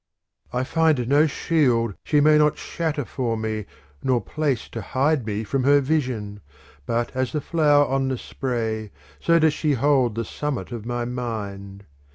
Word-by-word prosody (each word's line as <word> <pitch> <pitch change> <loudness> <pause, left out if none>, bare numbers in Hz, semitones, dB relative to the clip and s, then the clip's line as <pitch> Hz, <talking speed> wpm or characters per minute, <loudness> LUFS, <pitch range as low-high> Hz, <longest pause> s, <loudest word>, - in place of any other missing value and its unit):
II 125 - -1
I - - 0
find 155 -4 +2
no 145 +4 +4
shield 125 -8 +1
she 150 -1 +2
may 155 +1 +6
not 150 0 +3
shatter 155 -5 -3
for 115 -3 -2
me 110 -1 -3 0.3
nor 130 -2 +2
place 145 -2 -2
to 115 - -6
hide 135 +2 0
me 105 +1 -2
from 130 +4 -1
her 145 +2 +5
vision; 125 -8 -2 0.5
but 120 +2 -1
as 130 -1 -1
the 150 - 0
flower 145 -2 +3
on 135 0 0
the 130 -1 -1
spray 115 -5 -3 0.3
so 170 0 +3
does 160 -2 +4
she 150 -1 0
hold 130 -3 +2
the 115 0 -2
summit 145 +2 -4
of 115 -2 -6
my 120 -1 -2
mind. 100 -5 -5
130 Hz, 175 wpm, -23 LUFS, 115-150 Hz, 0.5 s, may